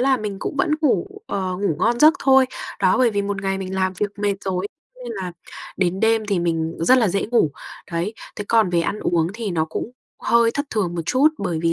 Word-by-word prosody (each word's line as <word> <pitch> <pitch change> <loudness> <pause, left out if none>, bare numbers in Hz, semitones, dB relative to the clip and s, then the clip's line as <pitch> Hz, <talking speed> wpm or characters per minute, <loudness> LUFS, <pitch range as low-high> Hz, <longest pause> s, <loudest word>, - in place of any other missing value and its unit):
là 265 +1 +3
mình 210 -4 -4
cũng 280 - -4
vẫn - - +1
ngủ, 300 +5 +2 0.2
ờ, 185 -2 -2
ngủ 195 -6 -1
ngon 235 +5 +1
giấc 310 +3 +7
thôi. 265 -1 +5 0.3
Đó, 185 +5 +3
bởi 250 -2 +4
vì 205 -1 -1
một 200 -1 -3
ngày 195 0 -1
mình 190 0 -5
làm 185 0 0
việc 205 - 0
mệt 205 -1 +1
rồi 190 0 -1 0.3
ấy, 250 - -14
nên 235 - -5
là 185 -4 -5 0.4
đến 185 0 0
đêm 225 -1 +2
thì 200 -3 0
mình 165 -1 -1
rất 255 +10 +5
là 225 -5 +3
dễ 195 +2 -1
ngủ. 230 -11 +3 0.4
Đấy, 175 +6 -2 0.2
thế 205 - -4
còn 225 -5 +3
về 175 -1 +2
ăn 200 +5 -2
uống 165 -2 +1
thì 225 -3 -4
nó 160 -3 0
cũng 160 +8 -5 0.3
hơi 235 0 +4
thất 285 +5 -3
thường 190 -6 -1
một 170 - -2
chút, 275 +4 +4
bởi 175 -5 -2
vì 165 - +2
200 Hz, 240 wpm, -21 LUFS, 180-235 Hz, 0.4 s, giấc